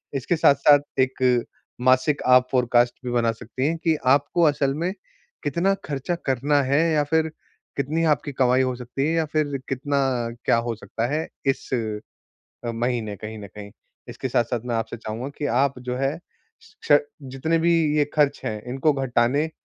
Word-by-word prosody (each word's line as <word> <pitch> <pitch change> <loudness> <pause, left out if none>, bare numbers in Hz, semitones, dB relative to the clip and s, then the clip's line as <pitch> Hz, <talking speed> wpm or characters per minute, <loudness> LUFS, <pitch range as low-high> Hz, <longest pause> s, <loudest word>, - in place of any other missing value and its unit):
इसके 135 +6 0
साथ-साथ 145 -1 +5 0.2
एक 130 -2 +2 0.4
मासिक 130 +3 +3
आप 125 0 +6
फोरकास्ट 120 -1 +3
भी 125 - -2
बना 115 -1 +2
सकती 120 +4 -4
हैं, 165 +2 -1
कि 165 -1 +1
आपको 145 +6 +3
असल 145 -3 +2
में 170 +5 -2 0.5
कितना 170 +7 +1
खर्चा 140 +4 -2
करना 140 +2 +2
है 140 +4 +2
या 150 -1 +3
फिर 160 +2 +1 0.5
कितनी 150 +4 0
आपकी 145 +1 -5
कमाई 130 0 +3
हो 130 -1 0
सकती 125 +3 -3
है 160 - 0
या 165 -1 +1
फिर 145 -3 0
कितना 140 +2 -1 0.5
क्या - - +4
हो 115 0 -2
सकता 115 +1 -4
है 155 +4 -2 0.2
इस 135 - -1 1.0
अ, 120 - -1
महीने 115 -3 -2
कहीं 110 +2 -8
न 105 - -8
कहीं। 105 -1 -9 0.4
इसके - - -5
साथ-साथ 120 0 0
मैं 120 - -2
आपसे 115 0 -3
चाहूँगा 115 +3 -5
कि 150 - -1
आप 135 +3 +1
जो 125 0 -4
है, 135 +4 -1 0.7
श 145 - +8 0.2
जितने 135 +5 -1
भी 170 +1 +3 0.2
ये 150 - +4
खर्च 145 -2 +2
हैं 105 -1 -3
इनको 135 +4 +2
घटाने 135 +3 +1
135 Hz, 170 wpm, -23 LUFS, 120-145 Hz, 1.0 s, श